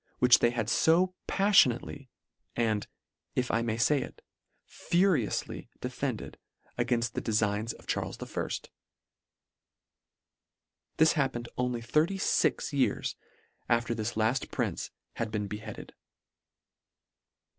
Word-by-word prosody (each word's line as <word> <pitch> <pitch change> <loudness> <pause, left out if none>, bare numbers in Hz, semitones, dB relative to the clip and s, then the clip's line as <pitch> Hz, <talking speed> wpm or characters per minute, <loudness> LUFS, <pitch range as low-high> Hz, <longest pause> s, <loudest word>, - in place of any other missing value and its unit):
which 125 -1 +6
they 120 - +4
had 120 -2 -2
fo 165 +10 +3
paffionately, 145 - +3 0.5
and, 110 -3 0 0.5
if 125 -1 0
I 115 - +2
may 115 -1 -1
fay 135 +4 +3
it, - - -9 0.4
furiously 175 - 0
defended - - -4 0.4
againft. 120 -1 0
the - - -3
defigns 105 0 0
of - - -17
Charles - - -2
I." - - -4 2.5
This 160 0 +5
happened 130 -6 -1
only 125 -1 -1
thirty 155 +10 +1
fix 185 - +1
years 135 -2 0 0.5
after 120 0 +2
this 110 0 -3
lafi: 110 +4 0
prince - - -2 0.3
had 115 -1 -1
been 105 -1 -2
beheaded. 105 +2 -7
120 Hz, 110 wpm, -30 LUFS, 115-140 Hz, 2.5 s, which